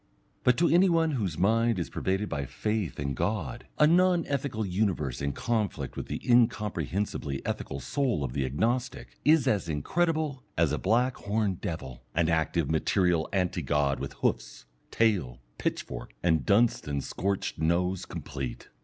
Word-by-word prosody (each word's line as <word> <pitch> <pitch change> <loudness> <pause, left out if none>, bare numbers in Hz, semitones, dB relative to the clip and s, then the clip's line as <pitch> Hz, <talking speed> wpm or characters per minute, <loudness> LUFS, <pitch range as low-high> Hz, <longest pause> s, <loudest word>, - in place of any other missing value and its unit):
But 125 -1 +4
to 170 - +4
any 180 +3 +5
one 165 -2 +3
whose 100 - -2
mind 115 +5 +3
is 85 - -3
pervaded 95 +2 -1
by 70 -6 -3
faith 105 - -2
in 70 -1 -2
God, 85 - -2
a 150 - +6
non 175 +1 +4
ethical 135 -6 -2
universe 90 - -1
in 70 0 0
conflict 105 - -2
with - - -5
the - - -3
incomprehensibly 105 - +1
ethical 70 - -3
soul 125 - 0
of 65 -2 -3
the 70 - 0
Agnostic, 120 - -1
is 155 -2 +4
as 100 -6 +1
incredible 155 - 0 0.2
as - - +3
a - - -1
black 125 +3 +2
horned 100 -3 -1
devil, 65 -7 -5
an 85 0 +2
active 80 -1 +1
material 85 +1 +1
anti 90 -2 0
god 70 -1 +1
with 70 0 -5
hoofs, - - -2 0.2
tail, 95 - +1 0.2
pitchfork, - - -4
and 80 -2 +2
Dunstan 100 -10 +2
scorched 100 +2 -2
nose 85 +3 0
complete. 65 -4 -6
95 Hz, 155 wpm, -28 LUFS, 75-120 Hz, 0.2 s, a